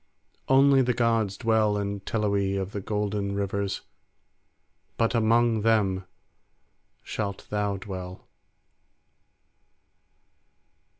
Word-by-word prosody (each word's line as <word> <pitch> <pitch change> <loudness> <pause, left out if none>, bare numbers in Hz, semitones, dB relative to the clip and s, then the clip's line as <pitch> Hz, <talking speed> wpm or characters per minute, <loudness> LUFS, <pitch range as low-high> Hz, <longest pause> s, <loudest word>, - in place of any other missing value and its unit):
Only 135 0 +5
the 125 -1 +1
gods 115 -4 +1
dwell 110 -3 +2
in 100 0 -3
Teloe 100 -1 0
of 95 0 -4
the 100 - -4
golden 105 -1 -2
rivers, 100 -1 -2 1.2
but 115 +1 +1
among 115 0 +3
them 100 -4 +2 1.0
shalt 100 -2 -4
thou 105 -1 0
dwell." 95 -1 -8
105 Hz, 85 wpm, -26 LUFS, 100-115 Hz, 1.2 s, Only